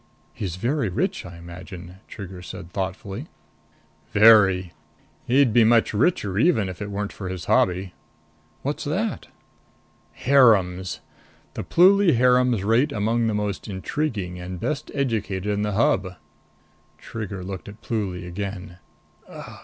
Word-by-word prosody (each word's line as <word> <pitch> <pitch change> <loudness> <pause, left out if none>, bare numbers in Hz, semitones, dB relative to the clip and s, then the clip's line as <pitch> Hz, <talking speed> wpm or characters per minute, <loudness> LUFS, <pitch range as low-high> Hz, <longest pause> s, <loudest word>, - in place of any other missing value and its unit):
"He's 90 -5 -4
very 120 +4 -1
rich, 90 - -2
I 85 -1 -11
imagine?" 85 +1 -10
Trigger 95 -3 -9
said 90 0 -9
thoughtfully. 95 0 -4 0.9
"Very. 100 -5 +6 0.5
He'd 130 -2 +4
be 120 -1 +6
much 115 0 +3
richer 105 - +1
even 115 - +3
if 90 - -8
it 105 - -4
weren't 100 0 -4
for 95 -2 -6
his 90 -2 -5
hobby." 90 0 +1 0.7
"What's 145 +2 -3
that?" 190 +9 -2 0.9
"Harems. 100 -9 +3 0.5
The - - -5
Pluly 185 -1 +5
harems 125 -3 +3
rate 115 +8 +2
among 115 +2 0
the 110 - 0
most 105 -1 -3
intriguing 100 -2 -3
and 90 0 -6
best 150 - -3
educated 105 -8 -1
in 100 - -1
the 105 0 -1
Hub." 95 -3 +1 0.8
Trigger 100 -4 -6
looked 95 +1 -7
at 100 - -13
Pluly 95 -6 -3
again. 90 -1 -6 0.5
"Ugh!" - - -10
100 Hz, 130 wpm, -24 LUFS, 95-120 Hz, 0.9 s, Very